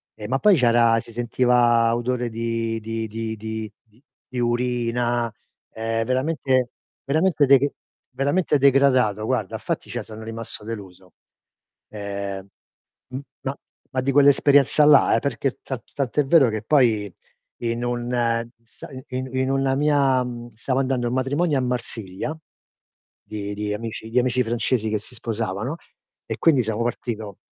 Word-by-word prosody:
e 105 Hz, -, -7 dB
ma 135 Hz, +2 st, 0 dB
poi 210 Hz, -2 st, +6 dB
c'era 115 Hz, -4 st, +4 dB
si 115 Hz, -, -10 dB
sentiva 120 Hz, 0 st, +3 dB
odore 120 Hz, 0 st, -1 dB
di 115 Hz, 0 st, -2 dB
di 115 Hz, +1 st, -4 dB
di 110 Hz, +1 st, -4 dB
di 110 Hz, 0 st, -5 dB
di 115 Hz, +5 st, -28 dB, 0.2 s
di 125 Hz, -, -5 dB
urina, 120 Hz, -1 st, 0 dB, 0.4 s
ehm, 115 Hz, 0 st, -1 dB
veramente 130 Hz, -1 st, 0 dB, 0.3 s
veramente 155 Hz, +1 st, +2 dB
deg 140 Hz, +1 st, +5 dB, 0.4 s
veramente 145 Hz, +3 st, +1 dB
degradato 130 Hz, -6 st, +3 dB
guarda, -, -, -1 dB
fatti -, -, -3 dB
cioè -, -, -3 dB
sono 110 Hz, 0 st, -10 dB
rimasto 115 Hz, -1 st, -7 dB
deluso. 95 Hz, -4 st, -9 dB, 0.8 s
Ehm 100 Hz, -2 st, -5 dB, 0.6 s
m 130 Hz, -, -5 dB, 0.2 s
ma 135 Hz, +1 st, -3 dB, 0.4 s
ma 130 Hz, -, 0 dB
di 135 Hz, -, 0 dB
quell'esperienza 145 Hz, +1 st, +5 dB
là 145 Hz, -1 st, +6 dB
eh, -, -, +3 dB
perché 135 Hz, -1 st, -2 dB
ta 130 Hz, -3 st, -5 dB
tant'è 140 Hz, +1 st, 0 dB
vero 140 Hz, -3 st, +5 dB
che 110 Hz, -1 st, -4 dB
poi 110 Hz, -7 st, +2 dB, 0.5 s
in 115 Hz, 0 st, -1 dB
un 120 Hz, 0 st, -2 dB, 0.5 s
sa 115 Hz, -, -13 dB
i 130 Hz, -1 st, -9 dB, 0.4 s
in 130 Hz, +1 st, 0 dB
una 135 Hz, 0 st, +1 dB
mia, 140 Hz, -3 st, +3 dB
mhmm, 120 Hz, -1 st, -6 dB
stavo 130 Hz, +4 st, -2 dB
andando 130 Hz, -2 st, 0 dB
a -, -, 0 dB
un 125 Hz, -, -2 dB
matrimonio 145 Hz, +4 st, +1 dB
a -, -, 0 dB
Marsiglia, 125 Hz, +1 st, -4 dB, 0.9 s
di 105 Hz, -1 st, -5 dB
di 105 Hz, 0 st, -2 dB
amici 110 Hz, 0 st, -6 dB
di 120 Hz, -, -2 dB
amici 125 Hz, 0 st, +1 dB
francesi 115 Hz, 0 st, 0 dB
che 110 Hz, -, 0 dB
si 110 Hz, +5 st, -10 dB
sposavano 115 Hz, +3 st, -3 dB, 0.5 s
e -, -, -3 dB
quindi 145 Hz, -7 st, +4 dB
siamo 110 Hz, +1 st, -2 dB
partito 110 Hz, -4 st, -4 dB
120 Hz, 150 wpm, -23 LUFS, 110-135 Hz, 0.9 s, poi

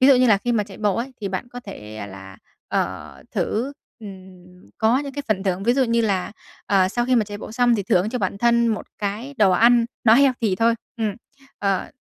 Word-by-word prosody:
ví 260 Hz, -, +6 dB
dụ 275 Hz, -, +8 dB
như 250 Hz, 0 st, +4 dB
là 210 Hz, -4 st, +5 dB
khi 240 Hz, +4 st, -1 dB
mà 215 Hz, -3 st, +1 dB
chạy 200 Hz, -1 st, -12 dB
bộ 205 Hz, -3 st, +1 dB
ấy, 255 Hz, +3 st, -3 dB
thì 200 Hz, -, -3 dB
bạn 190 Hz, +5 st, -4 dB
có 245 Hz, 0 st, -8 dB
thể 110 Hz, -, -8 dB
là, 95 Hz, 0 st, -11 dB, 0.3 s
ờ, -, -, -3 dB
thử, 250 Hz, +6 st, -1 dB, 0.3 s
ừm, 185 Hz, -3 st, -13 dB
có 225 Hz, +4 st, +3 dB
những 280 Hz, -1 st, -5 dB
cái 285 Hz, -, -4 dB
phần 195 Hz, -3 st, +1 dB
thưởng. 190 Hz, -1 st, -1 dB
Ví 240 Hz, -, +3 dB
dụ 265 Hz, +1 st, +2 dB
như 235 Hz, -1 st, +1 dB
là, 200 Hz, -4 st, -1 dB, 0.3 s
ờ, 190 Hz, -2 st, +3 dB
sau 240 Hz, +5 st, -1 dB
khi 255 Hz, -, +3 dB
mà 220 Hz, -, +3 dB
chạy 205 Hz, 0 st, -8 dB
bộ 215 Hz, -, -8 dB
xong 245 Hz, 0 st, +3 dB
thì 205 Hz, -, -1 dB
thưởng 185 Hz, +1 st, +2 dB
cho 250 Hz, -, -2 dB
bản 200 Hz, -1 st, -2 dB
thân 235 Hz, +1 st, +3 dB
một 220 Hz, -, -2 dB
cái 215 Hz, +7 st, -4 dB
đồ 205 Hz, -3 st, +5 dB
ăn 235 Hz, +5 st, +5 dB, 0.2 s
nó 220 Hz, -, +7 dB
healthy 245 Hz, -7 st, +3 dB
thôi. 230 Hz, +2 st, +3 dB, 0.2 s
Ừm, 220 Hz, -3 st, -1 dB, 0.4 s
ờ, 195 Hz, -2 st, -1 dB
215 Hz, 235 wpm, -22 LUFS, 190-240 Hz, 0.4 s, dụ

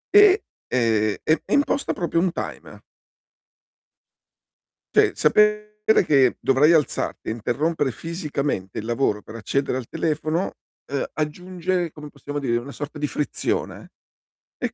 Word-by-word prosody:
e 410 Hz, -, +10 dB, 0.4 s
ehm, 110 Hz, -4 st, +2 dB, 0.2 s
e -, -, +8 dB, 0.2 s
e -, -, +3 dB
imposta 285 Hz, -1 st, 0 dB
proprio 170 Hz, -3 st, 0 dB
un 180 Hz, 0 st, +2 dB
timer. -, -, -7 dB, 2.1 s
Cioè -, -, +5 dB
sapere 210 Hz, 0 st, +4 dB, 0.4 s
che 135 Hz, -5 st, +4 dB
dovrai 135 Hz, +4 st, +4 dB
alzarti 155 Hz, -4 st, 0 dB
e -, -, 0 dB
interrompere 140 Hz, +6 st, 0 dB
fisicamente 145 Hz, -, -3 dB
il 110 Hz, -, -4 dB
lavoro 115 Hz, -3 st, 0 dB
per -, -, -11 dB
accedere 120 Hz, +5 st, -1 dB
al 120 Hz, -, -8 dB
telefono, 155 Hz, +3 st, -1 dB, 0.3 s
ehm, 140 Hz, 0 st, -2 dB
aggiunge, 180 Hz, +2 st, -2 dB
come 150 Hz, -1 st, -10 dB
possiamo 145 Hz, 0 st, -7 dB
dire, 125 Hz, -4 st, 0 dB
una 125 Hz, +4 st, -6 dB
sorta 145 Hz, +1 st, -7 dB
di 150 Hz, -, 0 dB
frizione 145 Hz, 0 st, -3 dB, 0.7 s
e -, -, -3 dB
145 Hz, 130 wpm, -23 LUFS, 125-170 Hz, 2.1 s, e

